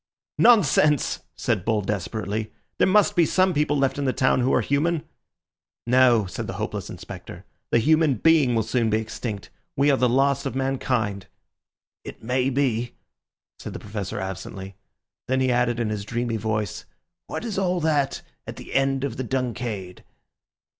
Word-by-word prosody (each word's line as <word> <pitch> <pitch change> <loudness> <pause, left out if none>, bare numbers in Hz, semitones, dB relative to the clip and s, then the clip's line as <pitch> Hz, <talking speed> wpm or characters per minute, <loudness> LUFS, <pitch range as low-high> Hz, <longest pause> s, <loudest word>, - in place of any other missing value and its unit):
"Nonsense!" 150 - +4 0.2
said - - -1
Bull 110 0 +1
desperately; 105 +2 -3 0.3
"there - - +4
must 205 +1 +4
be 175 - +5
some 185 +3 +2
people 145 -1 +1
left 135 0 +1
in 140 - -1
the 130 - +2
town 130 0 +2
who 125 +1 +2
are - - +3
human." 155 +3 0 0.8
"No," 120 -3 +4
said 95 - -5
the - - -4
hopeless - - -4
Inspector, - - -9 0.2
"the - - +3
human 155 +3 +3
being 145 -1 +3
will 110 - +2
soon 115 +1 0
be 110 - +2
extinct. 110 -1 -5 0.3
We 140 +2 +4
are 135 - +3
the 125 -1 +2
last 140 +2 +2
of 135 - -5
mankind." 125 -7 -1 0.8
"It - - -10
may 125 +3 +1
be," 125 -3 0 0.7
said - - -7
the - - -6
Professor 100 -2 -5
absently. 95 0 -6 0.5
Then 130 +1 +1
he 130 -1 +2
added 120 -1 +1
in 115 -2 0
his 105 -2 -3
dreamy 115 +1 -2
voice, 110 -2 -3 0.4
"What - - -5
is 215 -4 -2
all 180 -2 0
that 145 -3 0 0.2
at - - -6
the - - -10
end 135 0 +1
of 135 -4 -3
the 130 - -2
'Dunciad'? 120 -7 -4
125 Hz, 165 wpm, -24 LUFS, 110-140 Hz, 0.8 s, be